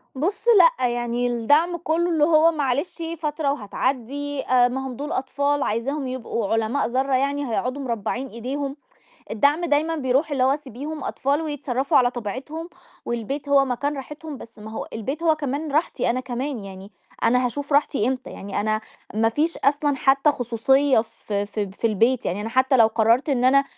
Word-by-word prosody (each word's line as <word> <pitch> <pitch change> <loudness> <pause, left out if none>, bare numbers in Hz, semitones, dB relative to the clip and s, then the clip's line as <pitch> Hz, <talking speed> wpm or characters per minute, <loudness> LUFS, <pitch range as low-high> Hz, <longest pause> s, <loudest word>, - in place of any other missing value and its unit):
بُص 345 - -2 0.3
لأ، 250 - +2
يعني 240 0 -1
الدّعم 290 +9 +2
كُلّه 340 +1 0
اللي 315 -3 +2
هو 320 +1 +5
معلش 290 +3 -2 0.2
فترة 300 -2 -1
وهتعدّي، 270 +4 -2
آآ 250 -1 +5
ما 265 +2 -3
هم 250 - -6
دول 290 +4 -5
أطفال، 280 +2 0
عايزاهم 265 +6 -2
يبقوا 230 -4 -3
علماء 225 +5 +1
ذرّة 265 +2 0
يعني، 280 +2 0
هيقعدوا 255 +5 -2
مربّعين 245 +1 -3
أيديهم، 270 +4 -4 0.6
الدّعم 285 +9 +2
دايمًا 315 +1 +1
بيرُوح 275 +2 +1
اللي 270 -3 0
هو 270 +2 +3
سيبيهم 295 +2 -7
أطفال 285 +4 0
ويتصرّفوا 275 -3 -1
على 245 -1 +4
طبيعتهم، 260 - -6 0.4
والبيت 270 +5 -4
هو 280 -1 +5
مكان 280 +3 -2
راحتهم، 300 +2 -7
بس 230 -1 -13
ما 215 +1 -9
هو 220 - -5
البيت 270 +9 -4
هو 320 -2 +3
كمان 290 +1 -3
راحتي 310 -3 +1
أنا 255 - 0
كمان، 255 -2 -4
يعني 195 0 -10 0.3
أنا 250 +1 +3
هاشوف 280 +4 -4
راحتي 280 -5 +2
إمتى؟ 260 -1 -3
يعني 200 0 -4
أنا 215 +1 0 0.3
ما 225 +1 +3
فيش 305 +8 0
أصلًا 290 0 +1
حتى 275 +2 +4
خصوصية 260 +2 +2
في 205 -2 -4
ف 215 - -10
في 200 +3 -2
البيت، 230 +4 +2
يعني 185 +4 -2
أنا 220 - -3
حتى 260 +2 +3
لو 230 -3 +7
قررت 230 +5 +2
إن 255 -3 +1
أنا 275 +2 +5
265 Hz, 175 wpm, -23 LUFS, 235-290 Hz, 0.6 s, لو